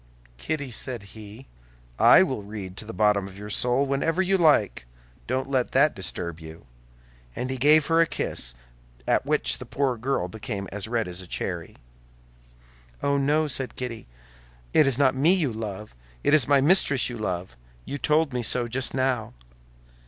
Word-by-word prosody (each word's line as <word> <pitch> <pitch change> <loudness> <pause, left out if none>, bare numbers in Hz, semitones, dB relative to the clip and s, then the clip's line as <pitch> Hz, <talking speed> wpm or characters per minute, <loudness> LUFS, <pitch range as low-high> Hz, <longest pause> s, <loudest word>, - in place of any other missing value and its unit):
"Kitty," 145 - -4
said 120 -1 -4
he, 110 +3 -11 0.5
"I - - +8
will 130 - -3
read 100 -2 -8
to - - -4
the 110 - -7
bottom 105 -3 +1
of 95 0 -12
your 105 +1 -7
soul 125 +5 +2
whenever 140 +5 -1
you 190 +1 +2
like; 145 - +2 0.4
don't 130 +2 -1
let 130 -3 -1
that - - +4
disturb 85 -1 -5
you." 80 -1 -12 0.7
And 130 +1 -3
he 130 - -3
gave 150 +3 +5
her 165 +1 +2
a 165 - +3
kiss - - -3 0.5
at - - +1
which - - +1
the - - -8
poor 135 -3 -1
girl 125 -5 -1
became 100 0 -6
as 105 +1 -5
red 115 -2 -1
as 90 +1 -7
a 90 - -12
cherry. - - -4 1.3
"Oh, 140 0 +1
no," 150 +3 +1
said 135 -2 -2
Kitty, 125 -3 -6 0.7
"it 150 - +5
is 135 -3 +1
not 140 -2 +3
me 150 +8 +4
you 150 -10 0
love! 105 -1 -6 0.3
It - - +2
is 150 -6 +5
my 140 -1 +4
mistress 145 -4 +4
you 120 -2 -6
love; 90 - -4 0.3
you 145 - -5
told 150 -1 +1
me 125 - -1
so 120 +1 +1
just 130 +3 -1
now." 130 - -1
125 Hz, 175 wpm, -25 LUFS, 105-140 Hz, 1.3 s, I